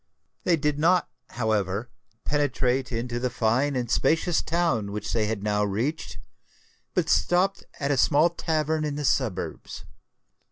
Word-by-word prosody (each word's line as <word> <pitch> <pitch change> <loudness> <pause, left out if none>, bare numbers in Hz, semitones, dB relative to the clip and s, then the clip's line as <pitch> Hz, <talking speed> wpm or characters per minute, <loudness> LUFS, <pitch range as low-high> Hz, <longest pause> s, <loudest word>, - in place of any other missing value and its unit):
They 175 - +4
did 150 -1 -1
not, 175 +2 +3 0.2
however, 110 -1 -1 0.3
penetrate 135 -3 0
into 120 +1 -2
the 125 +1 -1
fine 125 +5 +1
and 120 -2 -2
spacious 165 +1 +2
town 155 -12 0
which 105 0 -4
they 110 -2 +1
had 105 -2 -3
now 105 0 +1
reached; 115 +11 -2 0.8
but - - +1
stopped 185 +3 +2 0.2
at 140 0 0
a 140 - +1
small 155 +5 +4
tavern 155 -2 -1
in 150 -1 -2
the 145 0 -3
suburbs. 120 -7 -2
130 Hz, 145 wpm, -26 LUFS, 110-155 Hz, 0.8 s, They